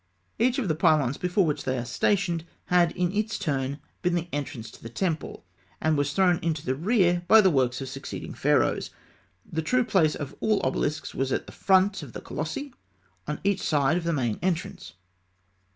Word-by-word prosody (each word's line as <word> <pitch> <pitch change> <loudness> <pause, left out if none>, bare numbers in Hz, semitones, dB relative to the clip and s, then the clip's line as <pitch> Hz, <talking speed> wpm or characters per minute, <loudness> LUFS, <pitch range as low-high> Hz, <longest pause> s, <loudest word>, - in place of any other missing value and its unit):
Each 245 +2 +3
of 255 -7 -1
the 160 - +2
pylons 155 -5 +2
before 180 +1 +2
which 150 -2 -1
they 130 0 -1
are 120 - -3
stationed 175 - 0 0.3
had 175 -2 +5
in 180 -1 0
its 215 +2 -1
turn 140 -5 -2 0.2
been 180 -1 +1
the 175 0 -2
entrance 135 -6 -4
to - - -16
the 115 - -8
temple, 160 - -3 0.3
and 155 0 +2
was 145 0 0
thrown 180 0 +3
into 165 -3 -2
the 130 - +1
rear 175 - +2
by 220 - +8
the 190 -3 +5
works 130 -3 +1
of 135 - -4
succeeding 135 +1 -7
Pharaohs. - - +1 0.6
The 160 - -3
true 250 +10 +2
place 170 -10 +2
of 145 -1 -6
all 215 -2 +2
obelisks 145 +3 -1
was 135 0 -1
in - - 0
front 190 0 +3
of 140 -6 -10
the - - -7
colossi, 160 - -5 0.5
on 150 0 -3
each 200 0 +1
side 145 0 +2
of 175 - -1
the 170 - 0
main 120 -8 -1
entrance. 185 +1 -3
165 Hz, 190 wpm, -26 LUFS, 140-190 Hz, 0.6 s, by